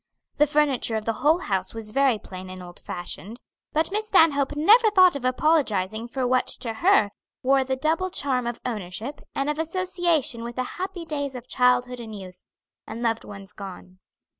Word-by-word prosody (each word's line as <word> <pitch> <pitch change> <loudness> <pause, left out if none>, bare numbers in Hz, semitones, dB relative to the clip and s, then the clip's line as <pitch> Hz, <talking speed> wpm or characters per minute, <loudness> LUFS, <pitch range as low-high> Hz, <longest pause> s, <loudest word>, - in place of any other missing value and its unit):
The 295 0 +4
furniture 285 -6 +2
of 215 -1 -3
the 225 - 0
whole 315 +5 +4
house 190 0 -2
was 220 -1 -5
very 270 -1 +3
plain 185 -2 -9
and 185 0 -8
old 175 0 -11
fashioned, 180 - -6 0.3
but 315 +4 0
Miss 430 +2 -1
Stanhope 295 -7 +4
never 435 +10 +6
thought 370 -5 +5
of 280 - -5
apologizing 235 - +1
for 255 +1 -2
what 255 +1 +2
to 235 -3 -3
her 275 - +3 0.3
wore 270 +1 +4
the 265 0 -1
double 320 +7 0
charm 260 -7 -1
of 240 -1 -4
ownership, 220 +3 -5
and 275 - -1
of 300 +1 -1
association 340 -7 0
with 235 0 -6
the 255 - -1 0.2
happy 375 -3 -4
days 285 -4 -3
of 250 0 -8
childhood 250 0 +2
and 220 -2 -8
youth, 185 -2 -11 0.5
and 225 +2 -6
loved 230 -1 0
ones 195 -1 -11
gone. 185 -2 -10
255 Hz, 185 wpm, -25 LUFS, 220-305 Hz, 0.5 s, never